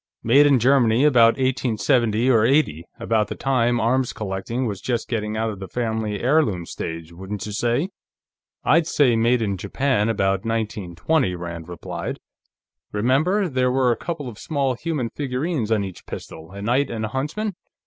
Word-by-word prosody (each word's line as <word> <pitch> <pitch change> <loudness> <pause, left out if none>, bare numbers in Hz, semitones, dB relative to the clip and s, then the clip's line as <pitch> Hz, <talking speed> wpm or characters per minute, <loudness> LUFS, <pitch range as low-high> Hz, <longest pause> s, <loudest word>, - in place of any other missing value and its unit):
"Made 140 +6 +6
in 140 -2 +5
Germany, 125 -1 +4
about 120 -5 +6
1870 120 -2 +1
or 110 -3 +4
'80, 115 - +2
about 115 -2 +1
the - - -5
time 120 -3 +1
arms 125 +3 +1
collecting 105 +4 -3
was 100 -5 -4
just 120 -3 -2
getting 110 -2 -2
out 110 0 0
of 100 - -8
the 95 - -6
family 110 -1 -2
heirloom 120 - +2
stage, 80 0 -6
wouldn't 95 +3 -6
you 105 - -5
say?" 120 - 0 0.7
"I'd 165 +2 +3
say 130 -8 +3
made 115 +1 +2
in 100 -2 -1
Japan, 125 +1 0
about 95 -3 +1
1920," 110 - -1
Rand 85 -1 -7
replied. 85 -3 -5 0.7
"Remember, 150 - +2
there 130 -4 +1
were 130 -1 +3
a - - +2
couple 160 -2 -5
of 110 -3 -9
small 140 -4 -1
human 135 -3 -3
figures 135 -2 -2
on 105 -2 +2
each 95 -2 -9
pistol, 80 0 -8
a 100 +1 -8
knight 125 +6 +1
and 110 -1 -3
a - - -4
huntsman? 160 - -2
115 Hz, 170 wpm, -22 LUFS, 105-130 Hz, 0.7 s, Made